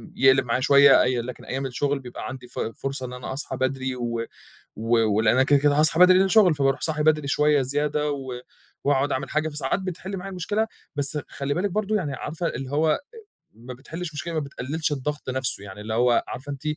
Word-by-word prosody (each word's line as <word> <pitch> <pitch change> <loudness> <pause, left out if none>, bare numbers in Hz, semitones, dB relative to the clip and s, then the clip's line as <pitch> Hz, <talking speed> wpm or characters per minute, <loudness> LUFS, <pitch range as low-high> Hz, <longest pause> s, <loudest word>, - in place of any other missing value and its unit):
يقلِب 135 0 +4
معايا 120 +1 0
شوية، 140 0 +6
اي 125 -1 0
لكن 125 +2 -8
أيام 135 +1 -3
الشغل 140 +2 -1
بيبقى 125 -2 -8
عَندي 130 -1 -8
ف 120 - -7
فرصة 135 +3 -3
إن 125 - -7
أنا 125 +1 -6
أصحى 140 - -4
بدري 130 0 -1
و 115 -2 -3 0.5
و 115 +2 +1 0.2
ولأن 110 +1 +3
أنا 130 - +4
كده، 145 +1 +4
كده 145 +1 +3
هاصحى 160 +2 +5
بدري 180 0 +8
لأن 185 - +5
ده - - -2
شُغل 190 -4 +5
فبارُوح 135 -2 +1
صاحي 155 -2 0
بدري 150 -1 +2
شوية 150 -1 +3
زيادة 150 +3 -1
و 130 -3 -5 0.4
وأقعُد 140 0 +2
أعمل 130 - -3
حاجة، 155 +1 0
فساعات 150 +3 -1
بتحِل 190 +1 -5
معايا 195 +1 -6
المشكلة، 205 +4 -1 0.3
بس 145 +1 +2
خلّي 140 0 -3
بالِك 195 +5 -1
برضه، 215 +2 0
يعني 150 -9 -2
عارفة 160 +5 -4
اللي 130 +1 -5
هو 155 +2 +2
أ - - +2 0.6
ما 120 +3 -10
بتحلّش 160 +5 -7
مشكلة، 165 +3 -5
ما 155 - 0
بتقلّلش 145 +2 -3
الضغط 145 0 -3
نفْسه 130 -6 -1
يعني، 100 0 -10
اللي 110 +1 -4
هو 120 +1 +3
عارفة 140 +3 -6
أنتِ 140 - -8
140 Hz, 215 wpm, -24 LUFS, 130-155 Hz, 0.6 s, بدري